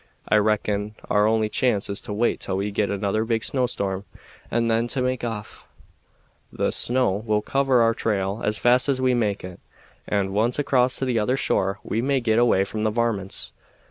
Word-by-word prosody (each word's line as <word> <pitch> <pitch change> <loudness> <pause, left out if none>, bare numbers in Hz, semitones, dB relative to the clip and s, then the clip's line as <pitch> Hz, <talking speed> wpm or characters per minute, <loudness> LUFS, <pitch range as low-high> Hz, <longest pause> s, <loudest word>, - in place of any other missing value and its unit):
I 105 - +4
reckon 105 0 0 0.2
our 105 +1 +4
only 110 -1 +2
chance 105 -2 0
is 100 0 -4
to - - -8
wait 110 +4 0
till 95 - -3
we 100 +2 -2
git 100 0 0
another 100 +2 -1
big 115 -1 -1
snowstorm 100 -7 -2 0.4
and 115 0 0
then 115 +1 +1
to 130 +2 0
make 125 -1 -1
off. 115 -3 -6 0.8
The - - -1
snow 120 -5 +2
will 105 -1 0
cover 135 -3 +2
our 115 0 +3
trail 100 -2 -2
as 105 0 +1
fast 125 +3 +3
as 135 -2 +1
we 130 -1 +2
make 105 -4 -1
it, 90 -1 -9 0.5
and, 95 -2 -1
once 115 +4 +1
across 130 -3 +2
to 135 - -1
the 125 -3 0
other 125 +5 0
shore, 95 -6 0
we 110 - -2
may 135 +1 +1
git 115 -2 +1
away 115 -5 +3
from 105 +2 -4
the 110 - +1
varmints. 110 -4 -2
110 Hz, 195 wpm, -23 LUFS, 105-120 Hz, 0.8 s, I